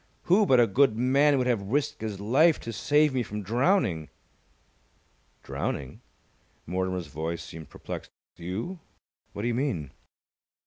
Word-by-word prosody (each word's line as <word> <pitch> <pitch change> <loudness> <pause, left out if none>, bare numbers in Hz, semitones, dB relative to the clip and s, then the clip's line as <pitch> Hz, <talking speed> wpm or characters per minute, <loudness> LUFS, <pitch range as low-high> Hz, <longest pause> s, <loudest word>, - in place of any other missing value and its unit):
Who 200 +4 +4
but 130 - +5
a 120 - +6
good 115 +1 +3
man 140 +4 +4
would 130 - +1
have 120 -5 +1
risked 125 +8 -1
his 105 -3 -4
life 140 +11 +4
to 115 - -6
save 150 +5 +3
me 130 - +1
from 105 -2 -5
drowning?" 115 - +1 1.3
"Drowning?" 65 -2 -4 0.6
Mortimer's 95 0 -2
voice 80 +2 -4
seemed 80 -2 -10
perplexed. - - -7 0.3
"You? 95 - -5 0.5
What 100 - -5
do - - 0
you 120 - 0
mean?" 115 - -2
115 Hz, 140 wpm, -27 LUFS, 95-140 Hz, 1.3 s, a